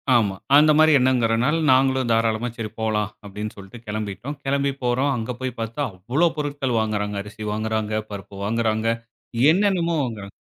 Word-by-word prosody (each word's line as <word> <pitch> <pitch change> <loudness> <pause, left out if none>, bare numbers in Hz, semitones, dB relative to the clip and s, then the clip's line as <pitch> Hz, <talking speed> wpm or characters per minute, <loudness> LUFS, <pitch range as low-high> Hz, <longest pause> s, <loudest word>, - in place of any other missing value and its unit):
ஆமா. 105 -5 +2 0.2
அந்தமாரி 155 +1 +6
எண்ணங்கரனால 125 +3 +2
நாங்களும் 130 -1 +3
தாராளமா 115 +1 +1
சரி 110 -2 -4
போலாம் 105 -2 0
அப்பிடின்னு 105 +1 -6
சொல்ட்டு 100 +4 -11
கெளம்பிட்டோம். 110 +6 -4
கெளம்பி 140 0 +1
போறோம், 130 +3 +1
அங்க 115 +2 -3
போய் 130 -2 -4
பாத்தா 115 +5 -4
அவ்ளோ 120 - +1
பொருட்கள் 140 -5 -1
வாங்குறாங்க. 105 -2 -1
அரிசி 105 +1 -9
வாங்குகிறாங்க, 110 0 -2 0.2
பருப்பு 100 -1 -8
வாங்குறாங்க, 110 0 0 0.6
என்னென்னமோ 180 -3 +2
வாங்குறாங்க. 105 -5 -6
115 Hz, 140 wpm, -23 LUFS, 105-135 Hz, 0.6 s, அந்தமாரி